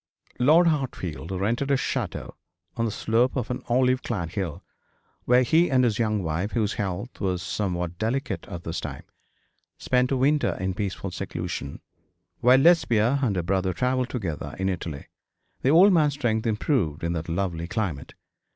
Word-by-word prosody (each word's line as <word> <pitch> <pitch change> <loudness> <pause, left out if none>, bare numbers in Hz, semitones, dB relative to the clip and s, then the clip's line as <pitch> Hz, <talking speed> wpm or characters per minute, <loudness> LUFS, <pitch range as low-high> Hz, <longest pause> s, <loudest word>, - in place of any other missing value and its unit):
Lord 155 +8 +6
Hartfield 130 - -2
rented 110 +9 -1
a 140 - +3
chateau - - -3 0.4
on 115 - 0
the 110 - -1
slope 115 +5 +1
of 125 -2 -2
an - - -3
olive 130 +1 +2
clad 90 -9 -3
hill, 90 -6 -4 0.6
where 125 +1 +5
he 160 +8 +3
and 130 -2 +3
his 115 -3 +1
young 105 -3 0
wife, 85 +6 -2
whose 110 -4 0
health 100 +4 -4
was 90 -3 -1
somewhat 90 -1 -3
delicate 110 -5 -2
at 85 -4 -7
this 80 - -3
time, - - -6 0.7
spent 125 0 +1
a 135 - +2
winter 145 +3 +2
in 95 0 -1
peaceful 95 -1 -4
seclusion; 70 -4 -5 0.6
while 125 +2 +6
Lesbia 135 -5 +4
and 115 -7 +1
her 90 - -1
brother 95 0 0
travelled 125 +3 0
together 90 - -4
in 95 0 0
Italy. 80 -6 -5 0.6
The 130 - +2
old 185 +6 +7
man's 150 -4 +3
strength 120 -5 -1
improved 105 - 0
in 85 0 0
that 80 0 -4
lovely 85 -1 -2
climate. 90 -8 -3
110 Hz, 165 wpm, -25 LUFS, 90-130 Hz, 0.7 s, old